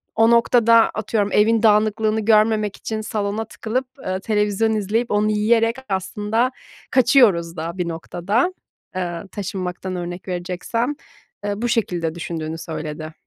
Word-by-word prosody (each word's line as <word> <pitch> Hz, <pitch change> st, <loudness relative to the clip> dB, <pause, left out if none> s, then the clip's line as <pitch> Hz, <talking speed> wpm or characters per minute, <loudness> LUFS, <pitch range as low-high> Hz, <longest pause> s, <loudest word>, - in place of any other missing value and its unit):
o 225 Hz, +1 st, +5 dB
noktada 230 Hz, -1 st, +5 dB
atıyorum 210 Hz, -1 st, -1 dB
evin 220 Hz, +2 st, +3 dB
dağınıklığını 215 Hz, 0 st, +3 dB
görmemek 215 Hz, -1 st, +3 dB
için 220 Hz, -1 st, -4 dB
salona 215 Hz, 0 st, -2 dB
tıkılıp, 230 Hz, +4 st, -3 dB, 0.2 s
eee, 185 Hz, 0 st, -1 dB
televizyon 210 Hz, +1 st, +1 dB
izleyip 220 Hz, +3 st, -1 dB
onu 210 Hz, +1 st, +2 dB
yiyerek 225 Hz, +2 st, +2 dB
aslında 210 Hz, +5 st, 0 dB, 0.4 s
kaçıyoruz 205 Hz, -, +4 dB
da 165 Hz, +3 st, -4 dB
bir 180 Hz, -2 st, -1 dB
noktada, 180 Hz, -, -1 dB, 0.4 s
eee, 175 Hz, -2 st, -3 dB
taşınmaktan 185 Hz, -2 st, -4 dB
örnek 175 Hz, +1 st, -6 dB
vereceksem. 185 Hz, +9 st, -2 dB, 0.5 s
Eee, 205 Hz, +1 st, -2 dB
bu 240 Hz, -, 0 dB
şekilde 175 Hz, -8 st, -1 dB
düşündüğünü 165 Hz, -2 st, -4 dB
söyledi. 155 Hz, -1 st, -6 dB
210 Hz, 125 wpm, -21 LUFS, 180-225 Hz, 0.5 s, o